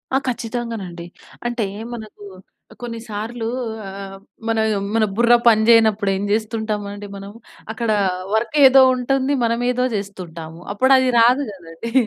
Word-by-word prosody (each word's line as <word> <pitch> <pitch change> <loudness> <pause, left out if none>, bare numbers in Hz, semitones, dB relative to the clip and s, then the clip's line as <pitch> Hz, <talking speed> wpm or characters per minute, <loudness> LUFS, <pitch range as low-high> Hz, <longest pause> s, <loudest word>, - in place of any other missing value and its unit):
ఆ! - - +5
ఖచ్చితంగానండి. 230 -7 -5 0.4
అంటే 240 -2 -1 0.3
మనకు 215 -3 -10 0.6
కొన్నిసార్లు 230 -1 -5 0.4
ఆహ్, 195 - -8
ఆహ్, 195 0 -9 0.3
మన 225 -1 +1 0.4
మన 225 - +3
బుర్ర 235 +2 +4
పని 220 -2 +5
చేయనప్పుడు 220 -3 +4
ఏం 195 +1 -2
చేస్తుంటామండి 210 -2 -3
మనము, 200 +1 -9 0.4
అక్కడ 230 0 -3 0.4
వర్క్ 220 +6 0
ఏదో 265 +1 +7
ఉంటుంది, 265 +2 0
మనమే 235 +1 0
ఏదో 250 0 0
చేస్తుంటాము. 170 -5 -7
అప్పుడు 260 +6 +2
అది 260 -1 +2
రాదు 245 +4 +5
కదండీ. 180 +2 -9
220 Hz, 130 wpm, -20 LUFS, 200-240 Hz, 0.6 s, ఏదో